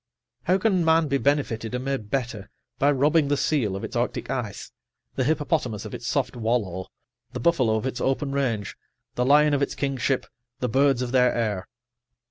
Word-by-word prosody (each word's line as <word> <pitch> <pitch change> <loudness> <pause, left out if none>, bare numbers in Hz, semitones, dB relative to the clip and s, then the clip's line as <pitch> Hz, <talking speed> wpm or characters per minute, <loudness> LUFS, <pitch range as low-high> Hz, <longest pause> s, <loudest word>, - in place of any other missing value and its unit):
How 185 +2 +3
can 195 -3 +2
man 160 -1 +3
be 140 0 +1
benefitted 125 -5 0
and 125 +1 -4
made 135 -7 -3
better 115 -6 -3 0.3
by 140 - +4
robbing 145 +2 +3
the 145 0 +1
seal 120 -13 0
of 100 - -5
its - - -6
arctic - - -2
ice, - - -4 0.4
the 130 - 0
hippopotamus 145 -6 0
of - - -8
its - - -6
soft - - 0
wallow, 110 -6 -1 0.5
the 125 - -4
buffalo 125 -6 +2
of 110 - -2
its 130 -2 -3
open 135 +1 0
range, 125 -7 -1 0.4
the 125 - 0
lion 150 +2 +5
of 140 - +1
its 140 - -1
kingship, 135 -1 -1 0.3
the 125 - 0
birds 135 +1 +3
of 120 - -4
their 125 -1 +4
air? 105 -5 -1
135 Hz, 185 wpm, -25 LUFS, 115-145 Hz, 0.5 s, lion